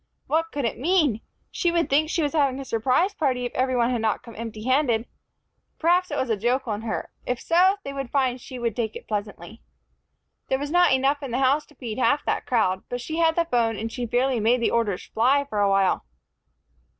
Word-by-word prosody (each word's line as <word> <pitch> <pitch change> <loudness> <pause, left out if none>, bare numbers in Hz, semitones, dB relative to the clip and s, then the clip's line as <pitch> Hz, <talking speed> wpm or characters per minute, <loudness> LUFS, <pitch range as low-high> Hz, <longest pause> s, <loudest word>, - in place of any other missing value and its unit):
What 325 +1 0
could 285 -3 -2
it 230 - -2
mean? 300 - +2 0.3
She 345 - 0
would 335 -1 +1
think 305 +3 +2
she 330 - 0
was 290 - -1
having 275 -4 +1
a 275 - -6
surprise 255 - +1
party 260 -9 0
if 245 - -5
every 255 0 0
one 240 0 +2
had 240 -3 -1
not 220 -1 0
come 235 - -11
empty 220 -1 -7
handed. 255 -3 +2 0.7
Perhaps 355 +2 +2
it 290 - -3
was 260 -3 -1
a - - +3
joke 245 +5 0
on 210 -1 -2
her. 225 -1 -4 0.2
If 250 -1 -1
so, 370 +4 +3
they 275 - -6
would 275 -3 -5
find 255 -2 0
she 255 - -9
would 235 -3 -2
take 220 -3 -2
it - - -9
pleasantly. 205 -1 -5 0.9
There 265 - +1
was 285 +2 -5
not 355 +1 +4
enough 270 +2 +2
in 275 - -5
the 240 - -1
house 270 +3 +2
to - - -21
feed 235 -2 -6
half 290 +3 +2
that - - -1
crowd, 190 -6 +1
but 245 - -3
she 315 +6 -5
had 325 -1 +3
the 340 - +2
phone, 230 -7 +1
and 225 +2 -4
she 245 0 -4
fairly 250 +1 +1
made 235 +4 +3
the 235 - +1
orders 215 -5 0
fly 270 +5 +2
for 210 -7 -3
a 200 -1 +3
while. 195 -1 +2
255 Hz, 230 wpm, -24 LUFS, 225-290 Hz, 0.9 s, not